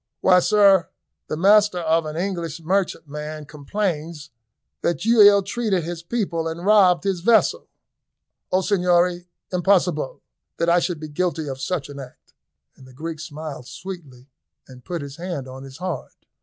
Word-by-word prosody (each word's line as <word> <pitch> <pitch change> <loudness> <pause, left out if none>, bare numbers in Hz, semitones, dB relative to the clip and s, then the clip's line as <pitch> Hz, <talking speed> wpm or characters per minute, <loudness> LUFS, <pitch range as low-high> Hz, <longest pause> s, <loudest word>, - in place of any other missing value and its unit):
"Why, 185 -1 +6
sir, 195 -1 +4 0.4
the 155 - -3
master 205 +2 +5
of 165 -1 +1
an 155 +1 -5
English 170 -3 -3
merchantman 155 -4 -3
complains 155 0 -4 0.5
that 170 - -1
you 230 -1 +5
ill 205 -1 +7
treated 200 -3 -1
his 170 +1 -5
people 170 -4 -2
and 165 +2 -5
robbed 195 -4 +5
his 195 -3 -1
vessel." 220 +5 +3 0.8
"O 185 - +3
Signori, 180 -2 +1 0.2
impossibile; 180 -5 +1 0.4
that 170 - +1
I 175 +1 +5
should 175 -2 -2
be 155 - -6
guilty 160 0 -2
of 135 -1 -6
such 150 0 -2
an 140 -1 -9
act!" 130 -2 -13 0.4
and 130 - -16
the 130 - -16
Greek 160 +4 -6
smiled 150 -4 -7
sweetly 150 -10 -9 0.4
and 125 -1 -14
put 175 -4 -4
his 140 0 -9
hand 170 -6 -5
on 130 +1 -9
his 135 0 -11
heart. 180 0 -6
170 Hz, 155 wpm, -22 LUFS, 150-185 Hz, 0.8 s, ill